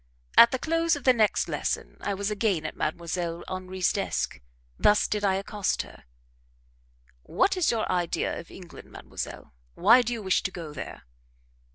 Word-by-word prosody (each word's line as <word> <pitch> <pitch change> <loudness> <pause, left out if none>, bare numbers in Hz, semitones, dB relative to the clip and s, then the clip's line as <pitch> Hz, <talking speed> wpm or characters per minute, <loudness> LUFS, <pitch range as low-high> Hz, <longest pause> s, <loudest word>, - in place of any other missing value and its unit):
At 235 - +9
the 260 - -1
close 330 +3 +1
of 290 - -8
the 255 - +6
next 220 -3 +2
lesson - - -3
I 200 - -2
was 200 +2 -2
again 200 -6 0
at 155 - -4
Mdlle. 170 +1 -3
Henri's 185 0 -1
desk. - - -2 0.4
Thus 210 0 +4
did 210 -1 -2
I 195 -2 +3
accost 200 +1 -1
her: - - -16 1.2
"What 380 - +1
is 365 -3 +2
your 225 -2 0
idea 175 -2 -1
of 170 - -11
England, 180 -2 -12
mademoiselle? - - -7 0.2
Why 230 +8 +6
do 240 0 -3
you 230 -3 -4
wish 190 -1 +2
to - - -2
go 165 -5 -8
there?" - - -8
200 Hz, 170 wpm, -27 LUFS, 180-235 Hz, 1.2 s, At